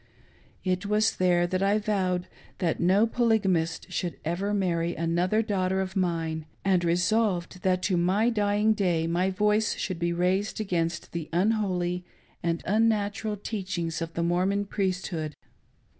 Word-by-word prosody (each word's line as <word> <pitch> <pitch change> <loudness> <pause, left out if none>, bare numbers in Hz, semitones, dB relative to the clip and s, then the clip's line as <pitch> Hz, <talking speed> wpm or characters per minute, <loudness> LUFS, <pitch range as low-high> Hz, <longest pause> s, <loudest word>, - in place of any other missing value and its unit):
It 185 +1 -1
was 215 +1 +2
there 175 -1 +3
that 185 +2 -1
I 200 +2 +3
vowed 185 -4 0 0.3
that 165 -3 -1
no 190 +5 +4
Polygamist 210 -8 +1
should 175 -2 -2
ever 180 +5 -1
marry 175 -4 0
another 175 +6 +1
daughter 190 -3 0
of 190 0 -3
mine, 165 -4 -1 0.2
and 185 -3 +3
resolved 180 +1 +1
that 185 -1 +1
to 185 -3 +1
my 195 +7 +2
dying 210 0 +2
day 175 -6 +1
my 175 +3 +1
voice 210 +3 +1
should 185 -3 -3
be 170 0 0
raised, 185 +5 0
against 170 -5 -2
the 165 -2 -5
unholy 180 -2 0 0.4
and 170 -1 -1
unnatural 210 0 +1
teachings 185 -6 -3
of 165 0 -4
the 170 - 0
Mormon. 185 +4 +1
Eriesthood. 185 -6 -2
185 Hz, 145 wpm, -27 LUFS, 170-205 Hz, 0.4 s, no